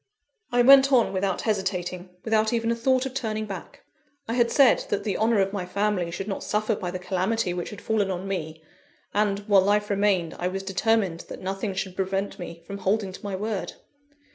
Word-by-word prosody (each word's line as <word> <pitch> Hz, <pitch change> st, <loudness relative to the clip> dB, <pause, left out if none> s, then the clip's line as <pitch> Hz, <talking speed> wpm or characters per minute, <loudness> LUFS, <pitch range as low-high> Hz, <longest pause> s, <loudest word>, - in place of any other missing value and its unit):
I 245 Hz, 0 st, +4 dB
went 275 Hz, +1 st, +8 dB
on 245 Hz, -6 st, +4 dB
without 190 Hz, -1 st, -1 dB
hesitating, 185 Hz, -3 st, -2 dB, 0.2 s
without 220 Hz, 0 st, +2 dB
even 230 Hz, 0 st, +1 dB
a -, -, +1 dB
thought 255 Hz, +2 st, +2 dB
of 265 Hz, -, -4 dB
turning 220 Hz, -5 st, -2 dB
back. 195 Hz, -4 st, -9 dB, 0.4 s
I 225 Hz, -, -2 dB
had 240 Hz, -1 st, +3 dB
said 275 Hz, 0 st, +5 dB
that 205 Hz, -, -1 dB
the 205 Hz, -4 st, -1 dB
honour 220 Hz, 0 st, +2 dB
of 195 Hz, +1 st, 0 dB
my 200 Hz, -3 st, -2 dB
family 200 Hz, -2 st, 0 dB
should 195 Hz, +4 st, -5 dB
not 195 Hz, -, -4 dB
suffer 215 Hz, +1 st, 0 dB
by 180 Hz, -3 st, -4 dB
the 180 Hz, -, -4 dB
calamity 185 Hz, +2 st, -1 dB
which 175 Hz, -1 st, -4 dB
had 210 Hz, -, -9 dB
fallen 215 Hz, -3 st, 0 dB
on 185 Hz, +1 st, -3 dB
me; 160 Hz, -4 st, -4 dB, 0.5 s
and, 205 Hz, -1 st, +1 dB
while 205 Hz, -2 st, +4 dB
life 205 Hz, +2 st, +1 dB
remained, 195 Hz, -5 st, +1 dB
I 180 Hz, -, 0 dB
was 190 Hz, +1 st, -3 dB
determined 195 Hz, -2 st, 0 dB
that -, -, -8 dB
nothing 195 Hz, +1 st, -3 dB
should 190 Hz, -1 st, -3 dB
prevent 195 Hz, +1 st, -2 dB
me 170 Hz, -1 st, -8 dB
from 200 Hz, +2 st, -7 dB
holding 200 Hz, 0 st, 0 dB
to 185 Hz, -, -11 dB
my 200 Hz, -2 st, -3 dB
word. 210 Hz, 0 st, -3 dB
200 Hz, 205 wpm, -25 LUFS, 185-220 Hz, 0.5 s, went